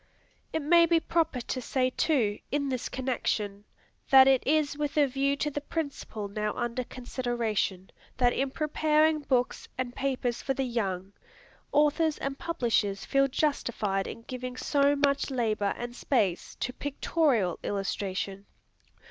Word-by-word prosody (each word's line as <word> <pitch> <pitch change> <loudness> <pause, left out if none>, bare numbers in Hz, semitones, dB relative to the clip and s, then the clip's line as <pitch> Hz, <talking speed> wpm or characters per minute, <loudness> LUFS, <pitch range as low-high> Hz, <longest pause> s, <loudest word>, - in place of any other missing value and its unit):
It 320 - -2
may 335 +3 +6
be 335 0 +4
proper 325 -6 0
to 255 +2 -4
say, 255 +1 0
too, 240 -9 +1
in 280 -1 0
this 255 -2 -2
connection, 210 -6 -2 0.4
that 265 -1 +8
it 265 -2 +5
is 300 0 +2
with 295 0 -3
a 295 - +6
view 275 +1 0
to 295 +1 -1
the 290 - -3
principle 280 -9 -4
now 210 +1 -2
under 240 +1 -2
consideration, 240 -7 -2 0.3
that 245 -1 +3
in 270 0 0
preparing 305 +1 +2
books 255 -3 0
and 255 -1 -3
papers 255 -3 -1
for 270 - -1
the 270 - 0
young, 195 -6 -2 0.6
authors 300 +1 +3
and 275 0 -4
publishers 225 - 0
feel 275 0 +3
justified 235 -9 -1
in 230 - -8
giving 255 0 -6
so 285 +1 +2
much 280 0 +1
labor 215 -6 0
and 240 0 -6
space 210 -11 0
to 250 - -2
pictorial 270 - 0
illustration. 195 0 -3
255 Hz, 145 wpm, -28 LUFS, 220-285 Hz, 0.6 s, that